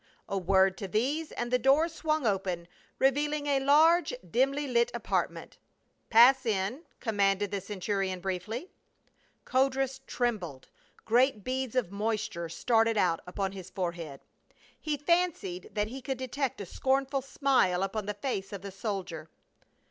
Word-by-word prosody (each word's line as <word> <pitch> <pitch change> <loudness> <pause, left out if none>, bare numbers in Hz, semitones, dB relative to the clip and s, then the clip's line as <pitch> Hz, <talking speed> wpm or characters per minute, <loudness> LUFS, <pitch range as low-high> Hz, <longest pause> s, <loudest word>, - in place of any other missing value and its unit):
A - - -3
word 190 0 +3
to 195 - -4
these 275 - -1
and 240 0 -3
the 250 - +3
door 275 +6 +4
swung 310 -3 -1
open, 185 -5 -1 0.3
revealing 290 +2 +1
a 280 -2 +2
large 315 +5 +5 0.2
dimly 275 +4 +1
lighted 235 -2 +2
apartment. - - -2 0.2
" - - -44
Pass 250 +4 +7
in," 215 +4 -1 0.2
commanded 200 -3 +1
the 200 -1 -2
centurion, 195 -1 -2
briefly. 195 - -4 0.7
Codrus 270 0 +1
trembled; 195 - -2 0.4
great 240 -2 +3
beads 260 0 -2
of 240 -8 0
moisture 205 -5 -2
started 225 +5 +2
out 170 -4 +2
upon 190 +1 -2
his 190 -2 -9
forehead. 170 -6 -4 0.6
He 300 -1 -2
fancied 295 - 0
tliat 210 0 +1
he 265 +3 -7
could 265 0 -3
detect 260 +1 -3
a - - -5
scornful 270 +6 0
smile 255 -10 +2
upon 195 +1 -3
the 210 - -2
face 200 -4 -3
of 200 -2 -7
the 200 - -6
soldier. 185 -6 -5
225 Hz, 145 wpm, -29 LUFS, 195-270 Hz, 0.7 s, Pass